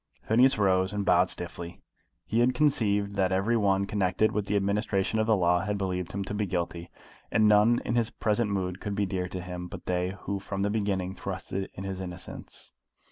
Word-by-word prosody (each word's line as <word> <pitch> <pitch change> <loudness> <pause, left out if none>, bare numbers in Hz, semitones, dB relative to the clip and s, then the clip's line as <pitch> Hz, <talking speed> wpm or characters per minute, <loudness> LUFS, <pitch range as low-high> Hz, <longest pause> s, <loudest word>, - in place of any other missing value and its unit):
Phineas 125 +4 +5
rose, 95 -1 +2
and 100 -1 -2
bowed 90 0 +4
stiffly. 85 0 -7 0.5
He 115 - 0
had 125 +1 +3
conceived 105 -8 +2
that 95 -1 +2
every 95 +5 +2
one 100 -3 +2
connected 100 +1 +1
with 105 -1 -2
the 105 - 0
administration 100 +1 0
of 110 - +1
the 110 - +5
law 90 -2 +3
had 100 +3 -2
believed 90 -2 -2
him 100 0 -3
to 95 - -5
be 105 -1 -1
guilty, 85 -1 -3 0.4
and 110 - +4
none 105 +3 +5
in - - -1
his 115 -2 +2
present 105 +1 0
mood 95 -2 -2
could 105 -1 -3
be 100 0 +1
dear 95 -1 -2
to 90 0 -5
him 90 0 -6
but - - -9
they 90 +1 -1
who 100 0 -3
from 100 0 -3
the 100 - +1
beginning 100 -4 -1
trusted 95 0 -5
in 95 - -6
his 95 -1 -4
innocence. 90 -1 -8
100 Hz, 205 wpm, -28 LUFS, 90-105 Hz, 0.5 s, Phineas